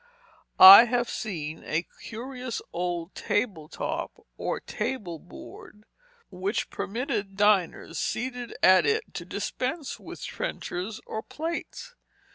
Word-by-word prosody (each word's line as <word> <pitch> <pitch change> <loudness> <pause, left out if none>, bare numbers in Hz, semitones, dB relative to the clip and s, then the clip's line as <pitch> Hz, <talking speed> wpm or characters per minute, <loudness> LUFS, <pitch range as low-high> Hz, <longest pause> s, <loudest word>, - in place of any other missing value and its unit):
I 195 +5 +12
have 240 0 -1
seen 160 -8 -5
a 160 +3 -1 0.2
curious 250 +1 -6
old 175 0 -3
table 200 -8 -2
top, - - -5
or - - -3
table 180 -11 -4
board, 210 +4 -13 0.5
which 190 +3 -2
permitted 200 -3 -3
diners 195 -6 +2
seated 245 0 -3
at 185 0 +6
it 445 0 0
to - - -6
dispense 275 +3 -4
with - - -10
trenchers 200 +7 -5
or 220 - -4
plates. 330 - -6
210 Hz, 110 wpm, -27 LUFS, 180-250 Hz, 0.5 s, I